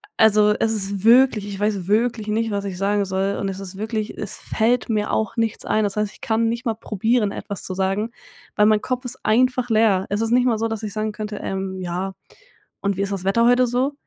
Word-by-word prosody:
also, 210 -1 +5
es 220 +1 +1
ist 200 -2 -1
wirklich 235 -2 +5
ich 200 -1 -6
weiß 205 -3 -1
wirklich 220 +1 +1
nicht, 220 +1 0
was 200 0 -2
ich 190 -2 -5
sagen 200 +2 +1
soll 190 +1 -1
und 195 - -1
es 190 0 -5
ist 195 -1 -8
wirklich 215 +1 -3
es - - -3
fällt 230 +2 0
mir 210 -2 0
auch 220 +1 -1
nichts 225 -1 -1
ein. 215 - +1
Das 200 0 -3
heißt, 210 -1 0
ich - - -18
kann 225 0 +1
nicht 235 +3 -4
mal 225 - 0
probieren, 220 0 0
etwas 200 -1 -6
zu 185 - -2
sagen, 195 +4 -1 0.4
weil 210 - +4
mein 215 -1 +3
Kopf 255 +2 -3
ist 250 - -3
einfach 250 +2 +2
leer. 215 -4 +3
Es 205 +2 -1
ist 225 - 0
nicht 245 +1 +4
mal 230 -4 +1
so, 225 - 0
dass 225 -1 -5
ich 210 -2 -4
sagen 215 0 -2
könnte, 210 0 -5
ähm: 190 -1 -4
„Ja 185 +2 -3 0.7
und 200 0 0
wie - - -1
ist 200 0 -1
das 190 -2 -4
Wetter 230 +4 +3
heute 245 +1 +5
so?“ 255 +4 0
215 Hz, 240 wpm, -22 LUFS, 200-225 Hz, 0.7 s, also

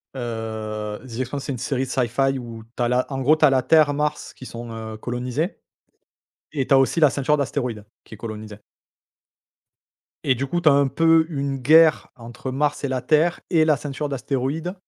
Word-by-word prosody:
Heu, 110 -3 -5
The 120 -1 -8
Expanse 135 +2 -4
c'est - - -3
une 130 - -4
série 130 +2 -2
de - - -10
sci-fi 135 +2 0
où 115 -2 -9
tu 125 - -1
as - - +2
la, 125 +1 +1
en 135 0 -3
gros 145 +4 +5
tu 155 - +4
as - - +6
la 135 -1 +2
Terre, 155 0 +4
Mars 150 +1 -2
qui 130 - -12
sont, 120 -1 -8
heu, 110 -1 -7
colonisées, 125 - -3 0.9
et 140 -4 -1
tu - - +3
as - - +7
aussi 135 +5 +2
la 150 -3 +6
ceinture 140 +2 +1
d'astéroïdes 125 -6 -3 0.2
qui - - -12
est - - -10
colonisée. 110 -2 -8 1.6
Et 130 - +2
du 135 +3 -3
coup 175 +5 -1
tu 160 - +5
as - - +6
un 140 0 +3
peu 165 +3 +4
une 140 -3 -2
guerre 160 +4 +5
entre 120 +2 -8
Mars 145 +3 -1
et - - 0
la 130 -1 -2
Terre 155 +6 +2
et 160 -4 +3
la 155 -2 +3
ceinture 145 0 -4
d'astéroïdes, 140 +5 -2
135 Hz, 205 wpm, -22 LUFS, 120-150 Hz, 1.6 s, as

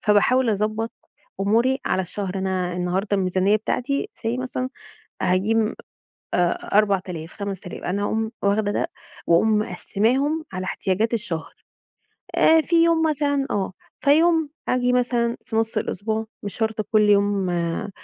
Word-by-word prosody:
فباحاول 230 +4 +4
أضبّط 215 +2 -1 0.5
أموري 235 +6 +2
على 190 - +1
الشهر، 190 +1 -4
أنا 185 -2 -1
النهارده 185 +3 0
الميزانية 190 +2 +2
بتاعتي 255 +5 -2
say 230 +2 -2
مثلًا 255 0 -3 0.5
هاجيب 215 +5 +2 0.6
4000 180 -2 0
5000 195 -3 -6
أنا 200 +3 -1
أقوم 220 +1 -1
واخدة 205 +1 +2
ده 330 - -1 0.4
وأقوم 210 +6 +4
مقسّماهم 260 - 0
على 185 - -3
احتياجات 210 +6 -1
الشهر، 205 -8 -3 0.8
آآ، 320 0 +6
في 335 +1 +3
يوم 330 -1 +3
مثلًا 285 -2 +1
آه، 195 -2 -1 0.3
فيوم 320 +1 +4 0.2
آجي 250 0 +2
مثلًا 240 -1 +1
في 220 - -4
نص 225 +1 0
الأسبوع 220 +2 -2 0.2
مش 200 - -5
شرط 220 -1 -1
كل 210 -1 +5
يوم 200 -2 +2
آآ، 170 +3 -2
215 Hz, 130 wpm, -23 LUFS, 190-245 Hz, 0.8 s, آآ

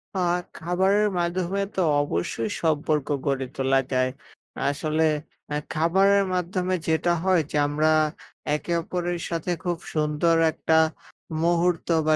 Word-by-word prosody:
আ - - -1 0.4
খাবারের 190 +5 +2
মাধ্যমে 180 +3 -1
তো 190 - +1 0.2
অবশ্যই 110 -1 -2
সম্পর্ক 150 -2 +1 0.2
গড়ে 135 -2 0
তোলা 135 0 +2
যায়। 130 0 +2 0.6
আসলে 155 +2 0 0.5
এ - - +1 0.2
খাবারের 195 +5 +3
মাধ্যমে 180 +1 -1
যেটা 160 +2 +2
হয় 185 -3 +3
যে, - - -4
আমরা 155 +2 +2 0.6
একে 170 +3 -3
অপরের 175 0 -3
সাথে 170 +1 -2
খুব 175 -2 -1 0.2
সুন্দর 155 +2 +2 0.2
একটা 160 0 +1 0.7
মুহূর্ত 175 0 +1 0.2
বা 155 - +5
165 Hz, 125 wpm, -25 LUFS, 150-180 Hz, 0.7 s, বা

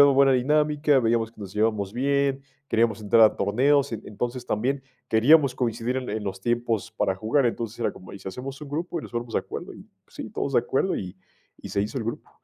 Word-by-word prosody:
en 140 -1 +7
buena 135 0 +5
dinámica, 150 +2 +3
veíamos 115 -1 +1
que - - -17
nos 95 -2 -7
llevábamos 105 -2 0
bien, 140 +1 +1 0.3
queríamos 115 -1 +2
entrar 110 +2 +4
a 110 - +6
torneos, 135 +7 +2
en 110 - -4
entonces 120 +4 -4
también 130 +5 -1 0.3
queríamos 135 +4 +5
coincidir 120 +1 -1
en 130 -1 -3
en 110 0 -3
los 95 -1 -5
tiempos 120 -1 -1
para 95 - 0
jugar. 110 +7 +1
Entonces 115 -1 -2
era - - 0
como: 90 - -13
"Y 100 - -9
si - - -6
hacemos 130 +8 -7
un 150 - -8
grupo 165 +3 -3
y - - -14
nos - - -9
ponemos 120 -1 -4
de - - +3
acuerdo" - - -7
y, - - -12 0.2
sí, - - -8
todos 140 - -3
de 125 - +5
acuerdo 135 +10 0
y 95 0 -6 0.4
y - - -8
se 100 - +1
hizo 110 +6 -3
el 115 - -4
grupo. 115 - -5
120 Hz, 225 wpm, -25 LUFS, 110-140 Hz, 0.4 s, en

